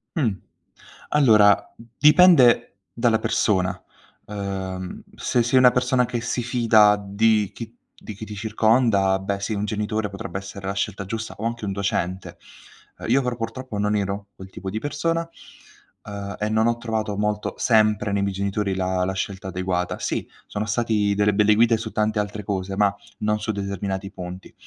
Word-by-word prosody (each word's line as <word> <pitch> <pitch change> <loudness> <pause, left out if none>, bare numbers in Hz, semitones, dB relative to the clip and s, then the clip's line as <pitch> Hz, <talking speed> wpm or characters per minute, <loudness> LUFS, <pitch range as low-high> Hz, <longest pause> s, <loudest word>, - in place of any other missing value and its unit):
Mh. 130 -9 +2 0.8
Allora, 110 -8 +4 0.3
dipende 145 - +6
dalla 115 -2 +2
persona. 90 -3 0 0.5
Uhm, 95 -2 -5
se 120 - 0
sei 120 +3 +3
una 125 -1 +7
persona 125 0 +2
che 120 -1 -3
si 120 +2 -2
fida 115 -4 +4
di 105 +1 +2
chi 115 0 -8 0.3
di 110 - -7
chi 105 +3 -8
ti 105 0 -8
circonda, 110 -2 +2
beh, 100 +1 -3
sì, 110 - -3
un 105 0 -2
genitore 105 +1 -2
potrebbe 95 -2 -6
essere 95 0 -8
la 95 - -1
scelta 100 0 -3
giusta, 110 +3 -5
o 105 - -7
anche 115 -1 -3
un 100 - -2
docente. 95 -3 -3 0.6
Uhm, - - -7
io 135 +4 +3
però 125 -1 -2
purtroppo 115 0 -5
non 105 +1 +1
ero 100 0 -3
quel 95 - -10
tipo 95 0 -6
di 110 - -3
persona, 165 +5 -2 0.8
uhm, 100 -1 -6
e 105 - -1
non 110 +1 +2
ho 120 0 +1
trovato 110 -3 -3
molto 105 0 -1
sempre 110 -2 +3
nei 100 - 0
miei 100 -1 -1
genitori 100 0 -1
la 95 -1 0
la 95 - -1
scelta 95 0 -4
adeguata. 90 -1 -2
Sì, - - -2 0.2
sono 105 - -3
stati 105 -2 +1
delle 105 0 +2
belle 105 0 +4
guide 115 +1 +4
su 110 0 -6
tante 105 0 0
altre 105 +1 -4
cose 95 -1 -3
ma 100 -1 +3 0.3
non 105 0 0
su 110 +1 -2
determinati 100 -1 -4
punti. 90 -1 -9
105 Hz, 175 wpm, -23 LUFS, 100-115 Hz, 0.8 s, una